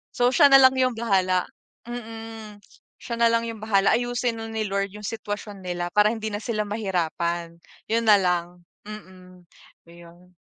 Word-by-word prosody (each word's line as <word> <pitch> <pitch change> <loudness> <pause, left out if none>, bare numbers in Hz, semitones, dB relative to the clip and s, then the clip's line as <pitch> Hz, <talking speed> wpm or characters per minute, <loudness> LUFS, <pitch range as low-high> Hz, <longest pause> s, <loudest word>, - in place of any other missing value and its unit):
So 245 0 +3
siya 290 -1 +7
na 270 - +10
lang 260 0 +7
yung 255 -2 +2
bahala, 185 -5 +1 0.4
mm. 225 -3 -8 0.4
Siya 235 - -5
na 235 - +5
lang 230 0 +1
yung 225 -2 -7
bahala, 200 -2 +3
aayusin 240 -1 -2
nun 225 0 -6
ni 220 -1 -1
Lord 200 0 -1
yung 210 0 -9
sitwasyon 205 -2 -6
nila 175 -1 -3
para 210 0 +5
hindi 220 -1 -4
na 205 - -4
sila 215 -1 -2
mahirapan. 170 -4 -2 0.4
Yun 230 +1 +1
na 210 -1 +8
lang, 175 -1 -1 0.3
mm. 185 -4 -12 0.4
Ayun. 170 +1 -17
210 Hz, 165 wpm, -24 LUFS, 180-230 Hz, 0.4 s, na